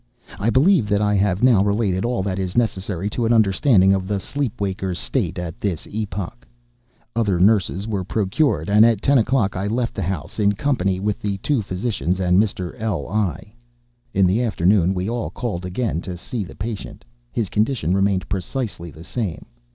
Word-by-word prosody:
I 105 - +1
believe 135 - +4
that 100 -1 +2
I 105 0 +2
have 100 0 +1
now 120 -6 +5
related 100 -1 0
all 120 -5 0
that 95 -1 -2
is 95 +1 -3
necessary 100 -4 0
to 115 0 0
an - - +1
understanding 100 -2 +4
of 95 -1 -1
the 100 0 -1
sleep 140 +3 -3
waker's 95 -2 -2
state - - -2
at 90 -2 -6
this 95 -6 -2
epoch. 105 +1 -5 0.7
Other 105 -6 +1
nurses 100 0 +2
were 100 -4 -2
procured; 100 - 0
and 105 +2 +6
at 115 -3 +3
ten 140 -2 +4
o'clock 115 -3 +1
I 95 +2 -2
left 115 +2 -1
the - - -4
house 85 +1 -4
in 100 -1 +3
company 100 -6 0
with 105 +1 -1
the 100 -1 -2
two 130 +5 0
physicians 95 -2 -2
and 90 +1 +4
Mr. 95 -4 -2
L—l. 100 -3 -1 0.8
In 95 0 +4
the 95 +6 +2
afternoon 95 -4 +2
we 90 +1 -2
all 120 0 -2
called 95 -7 -4
again 95 -2 -2
to 90 -1 -6
see 115 +4 -4
the 90 - -11
patient. 105 +2 -6 0.3
His 110 - -1
condition 105 - 0
remained 95 -3 +1
precisely 95 -2 -3
the 80 +2 -12
same. 100 -2 -4
100 Hz, 180 wpm, -21 LUFS, 95-115 Hz, 0.8 s, and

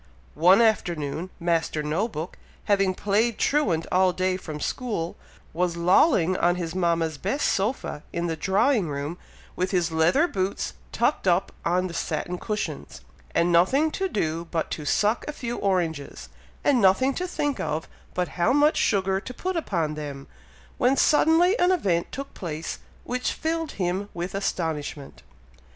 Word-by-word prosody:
One 180 +8 +6
afternoon, 170 -6 0
Master 165 -3 0
No 160 +9 0
book, 170 -5 -6 0.3
having 195 -2 +2
played 210 +4 +1
truant 185 - +1
all 185 0 +4
day 185 0 0
from 155 -5 -6
school, 205 - -3 0.4
was 175 0 0
lolling 185 - +4
on 175 0 +2
his 170 -2 -4
mama's 170 -4 0
best 275 +10 0
sofa 195 - -1
in 170 0 -2
the 165 -1 -1
drawing 200 - +2
room, 145 +4 -4 0.4
with 185 +1 -1
his 175 -3 +1
leather 165 - +3
boots 190 - -2 0.2
tucked 235 -2 0
up 180 +2 +2
on 180 +2 +1
the 180 - -5
satin 175 +1 -3
cushions, 70 - -4 0.3
and 170 +1 +3
nothing 265 - +4
to 385 +3 -2
do 165 - -1
but 165 -2 -2
to 150 - -4
suck 210 +9 +2
a - - -2
few 240 -4 -4
oranges, 170 -7 -2 0.3
and 270 -5 +3
nothing 210 +8 +4
to 365 +5 -3
think 290 -5 -2
of 155 +1 -2 0.3
but 180 -1 0
how 180 +7 +1
much 290 +3 +4
sugar 190 -2 +2
to 250 - -8
put 370 0 -3
upon 170 - -1
them, 145 -2 -6 0.5
when 255 +3 +3
suddenly 325 +7 +4
an 355 +1 +4
event 185 - 0
took 275 0 -6
place 160 -2 -5 0.2
which 250 +1 -2
filled 325 0 -2
him 190 +2 -2
with 175 +2 -4
astonishment. 160 -7 -3
185 Hz, 155 wpm, -25 LUFS, 165-235 Hz, 0.5 s, One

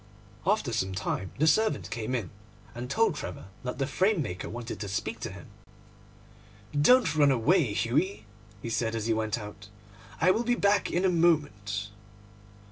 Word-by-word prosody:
After 190 - +1
some 95 -4 -1
time 95 -1 -2
the 155 - +3
servant 215 +8 +2
came 115 +3 -2
in, 115 -7 -3 0.4
and 120 +1 -6
told 220 +4 +3
Trevor 90 - -7
that 125 0 -4
the 135 - 0
framemaker 155 - 0
wanted 120 0 -6
to 105 - -4
speak 105 +3 -3
to - - -4
him. 95 -2 -10 1.3
'Don't 160 - +5
run 145 -2 +5
away, 135 - +3
Hughie,' 140 - 0 0.4
he 115 - -3
said, 115 0 0
as 110 -2 -2
he 115 - +2
went 110 0 -1
out, 105 -2 -9 0.5
'I 180 +4 +5
will 230 - +1
be 240 +1 +2
back 200 -2 +2
in 180 +2 +1
a - - +5
moment. 145 - +1
125 Hz, 165 wpm, -28 LUFS, 105-175 Hz, 1.3 s, Don't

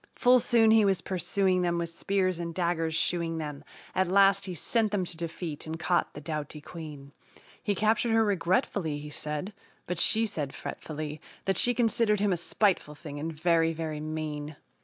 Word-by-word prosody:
Full 250 0 +5
soon 230 -2 +4
he 220 -1 +6
was 195 -2 +3
pursuing 185 0 0
them, 175 -1 +1
with 170 -1 -2
spears 185 0 0
and 170 -1 -4
daggers 165 -3 0
"shooing" 165 -1 0
them, 150 -2 -5 0.3
At 190 -1 +2
last 195 +1 +4
he 185 -2 -5
sent 220 +6 0
them 195 -3 0
to 175 - -6
defeat 165 -2 -5
and 160 +1 -5
caught 175 +2 0
the 145 - -7
doughty 150 -1 -5
queen. 150 -3 -9 0.5
He 205 -2 0
captured 220 +3 +2
her 225 0 +4
regretfully, 180 -4 0
he 150 0 -8
said, 150 +7 -4 0.3
but 180 -1 -3
she 225 +4 +4
said 150 -10 -4
fretfully 155 -1 -6 0.2
That 195 - +1
she 245 0 +5
considered 225 -3 +2
him 200 -1 +2
a - - 0
spiteful 175 -3 0
thing, 145 -1 -8
and 160 +3 -3
very, 165 +1 +2
very 155 -2 -4
"mean." 155 -1 -4
170 Hz, 180 wpm, -29 LUFS, 155-200 Hz, 0.5 s, he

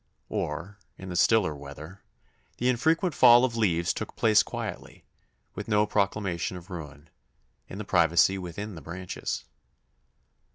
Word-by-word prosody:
Or, 85 +8 -4 0.2
in 95 - -9
the 90 - -5
stiller 95 -4 +3
weather, 70 +6 -10 0.6
the 125 - +1
infrequent 160 +8 +1
fall 120 -1 +7
of 120 -3 -3
leaves 85 -7 +1
took - - -6
place 110 -2 +4
quietly, - - -7 0.5
with - - -7
no 105 -1 +3
proclamation 100 -4 -1
of 90 +2 -13
ruin, 75 -3 -9 0.6
in 95 - -8
the 105 - -5
privacy 85 +2 +3
within 95 +4 -6
the 80 - -9
branches. 90 +5 -5
95 Hz, 135 wpm, -27 LUFS, 85-105 Hz, 0.6 s, fall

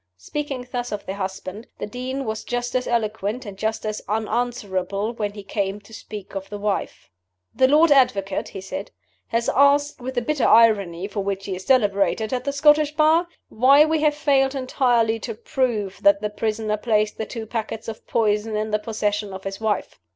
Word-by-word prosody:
Speaking 270 - -5
thus 245 -1 -3
of 210 - -4
the 190 - -4
husband, 190 +2 -6
the - - -4
Dean 255 +5 -4
was 220 -1 -3
just 245 0 -3
as 255 - 0
eloquent 220 0 -1
and 200 -2 -7
just 220 +3 -2
as 215 0 -3
unanswerable 215 -2 -1
when 210 -3 -3
he 205 -1 -9
came 200 0 -2
to 205 +2 -17
speak 210 -2 -9
of 195 0 -5
the 205 - -5
wife. 205 0 -3 0.4
"The 260 - +4
Lord 305 +3 +5
Advocate," 200 -8 +3
he 195 - -8
said, 195 +9 -6 0.4
"has 230 0 -1
asked, 285 0 +3
with 260 +2 -5
the 245 - 0
bitter 295 +1 +1
irony 200 -6 +4
for 205 0 -5
which 195 0 -3
he 190 - -3
is 185 - -9
celebrated 220 -2 +2
at 250 0 -2
the 280 - 0
Scottish 295 +1 +4
Bar, 320 +3 +4 0.2
why 275 +6 +6
we 315 -1 0
have 300 -1 +3
failed 280 -2 +2
entirely 245 -4 +1
to 225 0 -5
prove 230 -5 -2
that 200 0 +5
the 210 0 -3
prisoner 215 0 -1
placed 215 -1 0
the 220 - -3
two 225 -3 -6
packets 220 0 -4
of 220 -1 -8
poison 215 -1 +1
in 215 0 -2
the 215 - +1
possession 210 -1 -2
of 190 0 -8
his 195 0 -5
wife. 215 -3 -2
220 Hz, 195 wpm, -23 LUFS, 205-255 Hz, 0.4 s, why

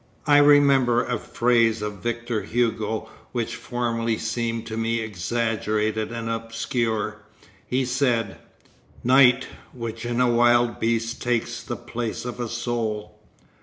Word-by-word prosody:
I 145 -1 +6
remember 140 -4 +5
a 120 -3 -2
phrase 115 -2 +2
of 105 -3 -5
Victor 120 0 -2
Hugo 110 -2 -1 0.3
which 120 -2 -2
formerly 115 -2 -2
seemed 115 -1 -2
to 110 - -5
me 115 +1 0
exaggerated 110 +1 -1
and 115 -1 -4
obscure; 115 -1 -2 0.5
he 130 +1 0
said: 125 -5 0 0.6
"Night, 125 0 +5 0.3
which 115 -2 -6
in 120 0 -2
a 125 - +4
wild 120 0 +3
beast 115 +1 -1
takes 120 -1 -1
the - - -5
place 120 -1 -5
of 125 0 -5
a 120 -2 -3
soul." 110 -3 -3
115 Hz, 130 wpm, -24 LUFS, 110-120 Hz, 0.6 s, I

